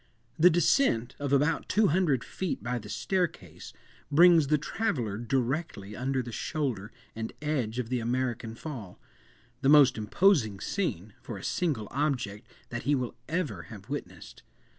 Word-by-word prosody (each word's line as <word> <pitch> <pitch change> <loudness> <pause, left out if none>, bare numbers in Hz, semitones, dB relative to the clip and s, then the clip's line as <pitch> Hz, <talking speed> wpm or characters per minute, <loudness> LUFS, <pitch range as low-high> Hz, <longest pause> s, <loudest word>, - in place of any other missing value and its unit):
The 175 +3 +8
descent 170 - +2
of 140 -1 -2
about 145 +3 +2
two 210 0 +4
hundred 155 -7 +2
feet 185 - -4
by 120 +1 -2
the 105 -2 -11
staircase, 160 - -2 0.4
brings 165 0 +6
the 150 +2 +3
traveller 140 - -2
directly 120 -3 -2
under 130 +2 -1
the 120 - -7
shoulder 120 -5 -3 0.2
and 110 0 -4
edge 135 -7 -2
of 125 -2 -2
the 125 -1 0
American 120 -1 -2
fall—the 120 - -7
most 140 -5 +6
imposing 110 - +3
scene, 110 - -3
for 115 - -7
a 95 - -10
single 145 - -1
object, 125 -7 -2 0.2
that 120 0 -4
he 145 +3 +2
will 125 -3 -2 0.2
ever 155 - -2
have 105 +1 -11
witnessed. 95 - -7
130 Hz, 145 wpm, -29 LUFS, 110-155 Hz, 0.4 s, The